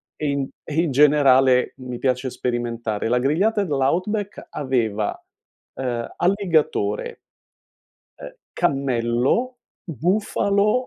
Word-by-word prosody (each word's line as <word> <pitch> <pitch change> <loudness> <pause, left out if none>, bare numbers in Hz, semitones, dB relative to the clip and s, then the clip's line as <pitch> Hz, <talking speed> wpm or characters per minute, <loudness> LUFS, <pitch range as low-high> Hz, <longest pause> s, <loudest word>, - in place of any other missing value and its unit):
e 150 - -3
in 140 -1 -1 0.2
e 150 - -7
in 165 -5 -1
generale 135 -3 +4
mi 125 -2 -7
piace 130 0 0
sperimentare. 120 -3 -3
La 125 0 +2
grigliata 195 - +1
dell' 155 -6 -3
outback 195 +8 -1
aveva, 115 -7 -1 0.6
ehm, 120 -3 -3
alligatore 170 - 0 1.0
ehm, 70 - -8 0.2
cammello, 125 - +1 0.5
bufalo 200 - +1
135 Hz, 100 wpm, -22 LUFS, 120-170 Hz, 1.0 s, generale